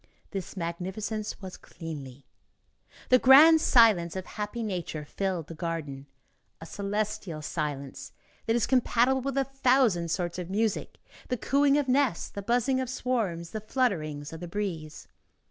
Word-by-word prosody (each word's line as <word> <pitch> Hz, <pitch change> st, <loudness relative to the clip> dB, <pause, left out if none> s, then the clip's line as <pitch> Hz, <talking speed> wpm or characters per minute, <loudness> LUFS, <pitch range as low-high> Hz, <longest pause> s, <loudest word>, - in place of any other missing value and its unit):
This 195 Hz, 0 st, -6 dB
magnificence 190 Hz, +5 st, -4 dB
was 185 Hz, -1 st, -7 dB
cleanly. 145 Hz, -6 st, -9 dB, 0.8 s
The 255 Hz, -, +6 dB
grand 305 Hz, +6 st, +8 dB
silence 210 Hz, -, +4 dB
of 185 Hz, -1 st, -4 dB
happy 210 Hz, +2 st, -5 dB
nature 175 Hz, -7 st, -4 dB
filled 185 Hz, 0 st, -3 dB
the 165 Hz, -, -9 dB
garden. 155 Hz, -5 st, -5 dB, 0.5 s
A 165 Hz, -, -9 dB
celestial 200 Hz, -4 st, -3 dB
silence 140 Hz, -3 st, -4 dB, 0.4 s
that 225 Hz, -, +2 dB
is 240 Hz, -, +2 dB
compatible 255 Hz, 0 st, +2 dB
with 275 Hz, +1 st, -3 dB
a 275 Hz, -, +3 dB
thousand 255 Hz, -10 st, +2 dB
sorts 175 Hz, +1 st, -2 dB
of 180 Hz, -1 st, -6 dB
music, 215 Hz, +2 st, -1 dB, 0.3 s
the 250 Hz, -, -1 dB
cooing 280 Hz, +5 st, +3 dB
of 290 Hz, -2 st, 0 dB
nests, 260 Hz, -7 st, +1 dB
the 200 Hz, -, -6 dB
buzzing 245 Hz, +5 st, +1 dB
of 260 Hz, -2 st, -3 dB
swarms, 220 Hz, -10 st, -2 dB
the 215 Hz, -, -5 dB
flutterings 165 Hz, -, -1 dB
of 160 Hz, -, -7 dB
the 175 Hz, -, -6 dB
breeze. 170 Hz, -5 st, -5 dB
200 Hz, 145 wpm, -28 LUFS, 165-245 Hz, 0.8 s, grand